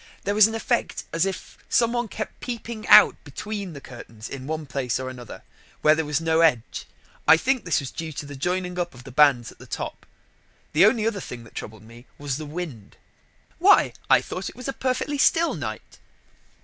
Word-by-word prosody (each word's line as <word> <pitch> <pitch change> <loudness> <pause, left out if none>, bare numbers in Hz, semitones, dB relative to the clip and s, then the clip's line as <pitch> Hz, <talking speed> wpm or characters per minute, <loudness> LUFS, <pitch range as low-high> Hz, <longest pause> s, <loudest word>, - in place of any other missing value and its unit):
There 200 - 0
was 210 0 +7
an 225 - -4
effect 235 +1 -1
as 165 +3 +2
if 190 - -7
some 235 0 +3
one 240 -1 -1
kept 215 +1 -6
peeping 235 -2 -6
out - - +7
between 205 -4 -6
the 140 - -8
curtains 115 -4 -10
in 135 -1 -7
one 155 0 -3
place 130 -2 -2
or 130 0 -4
another, 125 -2 -10 0.4
where 155 - +7
there 155 -1 -1
was 150 0 0
no 165 0 +1
edge, 125 -9 +1
and - - -31
I 160 - +8
think 255 +4 0
that 170 - +2
was 135 - -6
due 160 -1 -5
to 145 - -6
the 145 0 -8
joining 180 +5 -2
up 175 -6 -3
of 120 - -13
the 130 - -10
bands 135 -3 +4
at - - -20
the - - -13
top. - - -6 0.7
The 170 +7 +7
only 220 -1 +2
other 225 -3 0
thing 120 -7 -8
that 115 - -16
troubled 110 -1 -8
me 115 +3 -15
was 140 -2 -3
the 155 -1 -7
wind." 150 - -7 0.6
"Why, - - +5 0.2
I - - +6
thought 185 +1 -5
it - - -14
was 250 +1 -7
a 270 - -2
perfectly 265 +3 -2
still 330 +4 +4
night." - - -7
160 Hz, 215 wpm, -24 LUFS, 130-215 Hz, 0.7 s, I